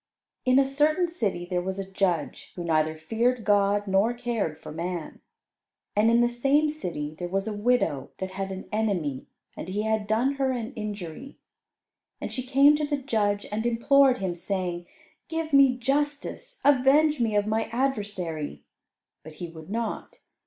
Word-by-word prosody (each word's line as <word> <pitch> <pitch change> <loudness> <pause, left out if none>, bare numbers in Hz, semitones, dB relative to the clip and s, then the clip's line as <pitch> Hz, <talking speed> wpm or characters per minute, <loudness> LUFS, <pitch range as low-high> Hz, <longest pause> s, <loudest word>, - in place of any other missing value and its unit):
In 255 0 +4
a 275 - +5
certain 300 +6 +2
city 205 - -2
there 180 -1 -1
was 190 +1 -4
a 195 -1 -4
judge 180 -6 -1
who 175 - -5
neither 155 -1 +1
feared 230 +8 0
God 205 0 +3
nor 200 +5 +2
cared 230 -10 -2
for - - -9
man. 170 +1 -5 0.7
And 215 +2 +4
in 235 +1 +4
the 240 - +4
same 275 +6 +2
city 160 - -5
there 175 - -3
was 195 +3 -2
a 220 - -2
widow 205 - +1
that 190 0 -4
had 195 0 -4
an 190 0 -7
enemy, 185 -11 -1 0.3
and 175 - -7
he 205 +3 -1
had 220 -1 0
done 245 +6 +1
her 265 -1 +2
an 240 +1 -4
injury. 210 - -6 0.8
And - - -5
she 255 - -2
came 275 +3 +5
to 305 - -2
the 290 -1 0
judge 215 -7 0
and 215 +1 -1
implored 255 +3 +4
him, 190 -5 -2
saying, 175 -1 -3 0.4
"Give 325 -2 -3
me 275 -2 +6
justice; 280 +3 -2
avenge 285 +2 +4
me 225 -3 +1
of 205 0 +3
my 220 +1 0
adversary." 200 - -3 0.6
But 155 - -11
he 175 +2 -6
would 160 +1 -12
not. 230 +2 -4
215 Hz, 170 wpm, -26 LUFS, 185-260 Hz, 0.8 s, me